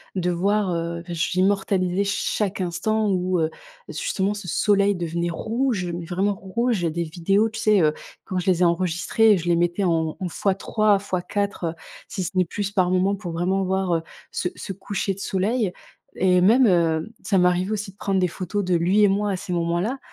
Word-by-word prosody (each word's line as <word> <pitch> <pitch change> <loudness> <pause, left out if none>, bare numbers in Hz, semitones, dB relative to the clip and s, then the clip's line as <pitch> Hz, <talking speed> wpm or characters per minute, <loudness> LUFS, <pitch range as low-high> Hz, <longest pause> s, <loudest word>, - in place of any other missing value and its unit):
de 180 -1 0
voir, 195 +1 +1
heu, 170 0 -3
j'immortalisais 185 +2 +1
chaque 200 0 -1
instant 190 +5 0
où, 185 -2 +1
heu, 160 0 0 0.4
justement 195 +1 -1
ce 200 -4 -7
soleil 200 +1 +3
devenait 170 0 -2
rouge, 225 +2 -1
mais 170 0 -4
vraiment 190 +4 0
rouge, 205 +3 -1
il - - -3
y 170 - +2
a - - 0
des 170 +2 -2
vidéos, 185 +6 +1
tu 225 +1 -6
sais, 215 -2 +4
heu, 155 -1 +3 0.3
quand 185 - -3
je 180 - -5
les 180 0 +2
ai - - +6
enregistrées, 185 +5 +3
je 170 - -5
les 175 - +4
mettais 175 +3 +1
en 160 -2 0
en 185 - -2
fois 190 +3 0
3 210 0 +2
fois 185 -3 -3
4, 200 +1 -3
heu, 165 - -3 0.4
si 190 - -4
ce - - -4
n'est 185 - +5
plus 200 +3 -3
par 185 -3 +2
moment 185 +2 +2
pour 190 -3 -6
vraiment 180 +4 0
voir, 190 -1 0
heu, 165 - -1 0.3
ce 180 - -2
ce 195 - -5
coucher 195 +1 -3
de 190 - -12
soleil, 200 +2 0 0.5
et 180 -1 +3
même, 235 +7 +5
heu, 170 +1 +1
ça 195 - +1
m'arrivait 180 +2 +2
aussi 210 -2 -3
de - - -29
prendre 195 -1 -1
des 180 - +2
photos 185 +3 -3
de 180 -1 +2
lui 185 +5 +3
et - - +7
moi 200 +1 +1
à 190 - -1
ces 180 -1 -5
moments-là 175 +9 -1
185 Hz, 210 wpm, -23 LUFS, 175-205 Hz, 0.5 s, et